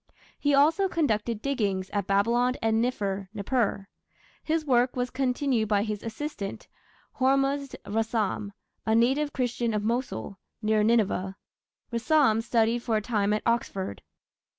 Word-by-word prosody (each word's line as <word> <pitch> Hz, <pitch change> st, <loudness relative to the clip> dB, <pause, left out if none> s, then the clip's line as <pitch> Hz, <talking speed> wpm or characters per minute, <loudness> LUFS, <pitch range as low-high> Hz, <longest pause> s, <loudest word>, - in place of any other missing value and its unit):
He 290 Hz, -1 st, +3 dB
also 325 Hz, +8 st, +4 dB
conducted 230 Hz, -, 0 dB
diggings 205 Hz, -9 st, -1 dB
at 200 Hz, -3 st, -2 dB
Babylon 235 Hz, +6 st, +2 dB
and 225 Hz, 0 st, +2 dB
Niffer 200 Hz, -6 st, -2 dB
(Nippur). 205 Hz, -2 st, -1 dB, 0.6 s
His 315 Hz, 0 st, 0 dB
work 250 Hz, -2 st, +2 dB
was 250 Hz, 0 st, -2 dB
continued 255 Hz, -3 st, 0 dB
by 205 Hz, -1 st, +2 dB
his 210 Hz, -1 st, -3 dB
assistant, 225 Hz, -2 st, -5 dB, 0.5 s
Hormuzd 275 Hz, +1 st, +1 dB
Rassam, 215 Hz, -1 st, -1 dB, 0.3 s
a 220 Hz, -, +2 dB
native 270 Hz, +6 st, +2 dB
Christian 240 Hz, -4 st, -1 dB
of 210 Hz, -, -1 dB
Mosul, 220 Hz, -, -3 dB, 0.2 s
near 215 Hz, -1 st, +2 dB
Nineveh. 210 Hz, -4 st, +1 dB, 0.6 s
Rassam 235 Hz, -2 st, +3 dB
studied 230 Hz, 0 st, +2 dB
for 225 Hz, -2 st, 0 dB
a -, -, -1 dB
time 210 Hz, -3 st, 0 dB
at 210 Hz, -, 0 dB
Oxford. 195 Hz, -, -1 dB
230 Hz, 130 wpm, -27 LUFS, 210-260 Hz, 0.6 s, also